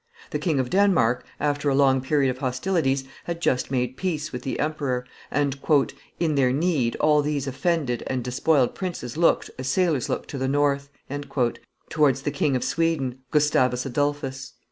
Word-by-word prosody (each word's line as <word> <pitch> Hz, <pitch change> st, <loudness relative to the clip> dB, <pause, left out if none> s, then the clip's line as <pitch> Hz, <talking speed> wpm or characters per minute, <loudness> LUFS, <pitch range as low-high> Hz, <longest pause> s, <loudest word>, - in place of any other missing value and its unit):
The -, -, -1 dB
King 160 Hz, -7 st, 0 dB
of 125 Hz, -1 st, -1 dB
Denmark, 180 Hz, -, +3 dB, 0.2 s
after 145 Hz, 0 st, 0 dB
a 135 Hz, -, +2 dB
long 135 Hz, -1 st, +4 dB
period 135 Hz, 0 st, +2 dB
of 130 Hz, -, -8 dB
hostilities, 135 Hz, +1 st, 0 dB, 0.2 s
had 170 Hz, -1 st, -4 dB
just 130 Hz, -6 st, +1 dB
made 125 Hz, -1 st, -1 dB
peace 155 Hz, -5 st, -2 dB
with 125 Hz, -, -5 dB
the 135 Hz, -, -4 dB
emperor; 140 Hz, -5 st, -1 dB, 0.2 s
and, 140 Hz, -1 st, 0 dB, 0.6 s
"in 165 Hz, -2 st, +1 dB
their 135 Hz, -3 st, +3 dB
need, 140 Hz, -5 st, +1 dB
all 150 Hz, -1 st, +3 dB
these 145 Hz, -2 st, -1 dB
offended 140 Hz, -2 st, -1 dB
and 130 Hz, -2 st, -2 dB
despoiled 130 Hz, +2 st, +2 dB
princes 170 Hz, -10 st, -5 dB
looked, 165 Hz, +1 st, +2 dB
as 130 Hz, -, -4 dB
sailors 155 Hz, -3 st, +1 dB
look -, -, -2 dB
to 140 Hz, -, -5 dB
the 130 Hz, -, 0 dB
north," 140 Hz, 0 st, +1 dB, 1.0 s
towards 140 Hz, -4 st, +2 dB
the 145 Hz, -, -1 dB
King 140 Hz, -1 st, +1 dB
of 125 Hz, -, 0 dB
Sweden, 150 Hz, -7 st, 0 dB
Gustavus 130 Hz, -4 st, +2 dB
Adolphus. 140 Hz, 0 st, -2 dB
140 Hz, 165 wpm, -24 LUFS, 130-155 Hz, 1.0 s, long